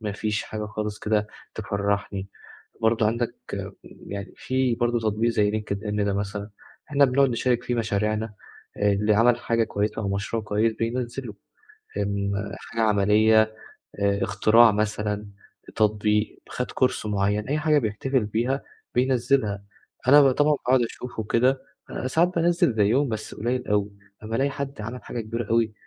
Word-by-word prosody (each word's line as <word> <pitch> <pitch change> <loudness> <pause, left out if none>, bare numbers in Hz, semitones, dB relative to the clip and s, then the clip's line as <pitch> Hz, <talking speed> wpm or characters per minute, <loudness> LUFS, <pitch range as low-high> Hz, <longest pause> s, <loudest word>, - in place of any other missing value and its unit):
ما 105 -2 -3
فيش 110 +2 -2
حاجة 105 -1 -5
خالص 105 -1 -4
كده 105 -1 0 0.3
تفرحني، 100 -1 -2 0.5
برضه 110 -1 +3
عندك 115 +1 -1 0.7
يعني، 100 -1 -6
في 130 -2 0
برضه 120 0 +1
تطبيق 110 +1 +1
زي 105 -2 +2
linkedin 105 -1 -2
ده 100 - 0
مثلًا، 100 +1 -3 0.4
إحنا 140 -1 +5
بنقعد 135 +1 +3
نشارك 120 0 0
فيه 120 - -1
مشاريعنا، 110 -1 -1 0.4
اللي 105 +1 +2
عمل 120 +2 +4
حاجة 115 -1 +1
كويسة 105 +1 -2
أو 100 - -2
مشروع 105 +3 -2
كويس 110 +2 +1
بينزله، 120 0 -3 0.6
آمم، 100 0 -1 0.3
حاجة 115 - -3
عملية، 110 +1 +4 0.6
آآ 100 0 +1
اختراع 110 +3 +5
مثلًا، 105 0 -1 0.5
تطبيق، 105 0 +1
خد 125 - -4
Course 130 -4 0
مُعيّن، 105 +1 0
أي 150 +1 +1
حاجة 150 -1 +3
بيحتفل 120 +2 -1
بيها 120 +6 -1 0.3
بينزلها، 125 -5 +1 0.4
أنا 145 +2 +8
بقى 135 -2 +5
طبعًا 150 +1 +3 0.2
باقعد 130 -1 +5
أشوفه 115 0 -5
وكده، 125 +5 +2 0.5
ساعات 170 +7 +2
بانزّل 170 -6 +3
زيهم، 115 +6 +3
بس 110 -1 -5
قُليّل 125 +3 -2
أوي، 105 0 +1 0.3
أمّا 110 +1 -3
ألاقي 140 +1 +2
حد 140 -3 -5
عمل 115 +4 -6
حاجة 120 - -4
كبيرة 115 0 -4
أوي، 115 -2 +2
110 Hz, 145 wpm, -25 LUFS, 105-125 Hz, 0.7 s, أنا